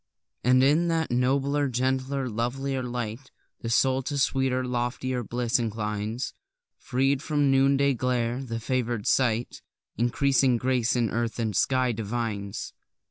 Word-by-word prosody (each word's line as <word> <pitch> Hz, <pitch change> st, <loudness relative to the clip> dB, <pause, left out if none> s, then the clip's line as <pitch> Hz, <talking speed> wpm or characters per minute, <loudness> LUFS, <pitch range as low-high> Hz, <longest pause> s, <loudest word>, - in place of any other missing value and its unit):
And 130 Hz, +1 st, +5 dB
in 155 Hz, +5 st, +4 dB
that 165 Hz, -3 st, 0 dB
nobler, 140 Hz, +3 st, +1 dB
gentler, 130 Hz, +2 st, -1 dB
lovelier 130 Hz, +4 st, -2 dB
light, 120 Hz, +1 st, -5 dB, 0.3 s
The 115 Hz, -, -5 dB
soul 130 Hz, +2 st, +3 dB
to 145 Hz, -, -2 dB
sweeter, 130 Hz, -2 st, +1 dB
loftier 125 Hz, +1 st, -2 dB
bliss 120 Hz, +1 st, 0 dB
inclines; 110 Hz, +1 st, -3 dB, 0.5 s
Freed 135 Hz, +1 st, 0 dB
from 150 Hz, -1 st, -1 dB
the 135 Hz, -1 st, +4 dB
noonday 140 Hz, +1 st, +3 dB
glare, 125 Hz, 0 st, -1 dB
the 115 Hz, -3 st, -4 dB
favour'd 120 Hz, -2 st, -2 dB
sight 120 Hz, -2 st, +1 dB, 0.4 s
Increasing 130 Hz, +1 st, +2 dB
grace 125 Hz, -1 st, +1 dB
in 120 Hz, -3 st, +1 dB
earth 115 Hz, 0 st, -2 dB
and 110 Hz, -4 st, -2 dB
sky 130 Hz, +6 st, +2 dB
divines. 105 Hz, -2 st, -4 dB
125 Hz, 135 wpm, -26 LUFS, 115-135 Hz, 0.5 s, And